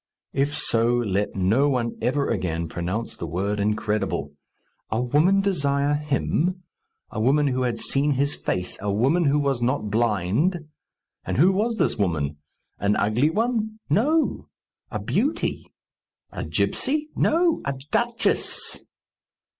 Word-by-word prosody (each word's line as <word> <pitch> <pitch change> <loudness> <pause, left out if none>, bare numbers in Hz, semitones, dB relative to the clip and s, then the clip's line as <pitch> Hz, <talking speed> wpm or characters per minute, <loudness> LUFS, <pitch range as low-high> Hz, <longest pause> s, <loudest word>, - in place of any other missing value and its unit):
If 140 +2 0
so, 115 +1 +2
let 105 -4 -1
no 110 +10 +3
one 120 -4 -1
ever 140 +4 +1
again 85 -6 -1
pronounce 90 +8 -3
the 85 - -5
word 100 +6 -2
incredible! 105 -7 -1 0.6
A 110 - 0
woman 150 +11 +3
desire 145 -7 +1
him! 150 +5 0 0.5
A 110 - -3
woman 140 +5 +3
who 130 0 -1
had 120 -2 0
seen 140 +5 +1
his 140 +2 0
face! 90 0 -3
A 105 0 -1
woman 135 - +2
who 140 +1 +3
was 140 -4 0
not 120 -4 0
blind! 115 - +1 0.6
And - - -3
who 175 +8 +6
was 220 +5 0
this - - +1
woman? 75 -7 0 0.4
An 100 +1 +2
ugly 110 +9 +2
one? 220 +2 -1
No; 300 - +2 0.4
a - - -3
beauty. 280 +9 -1 0.6
A - - -5
gipsy? 300 +2 0
No; 335 +1 +2
a 140 0 -2 0.2
duchess! 235 -1 0
135 Hz, 135 wpm, -24 LUFS, 105-170 Hz, 0.6 s, who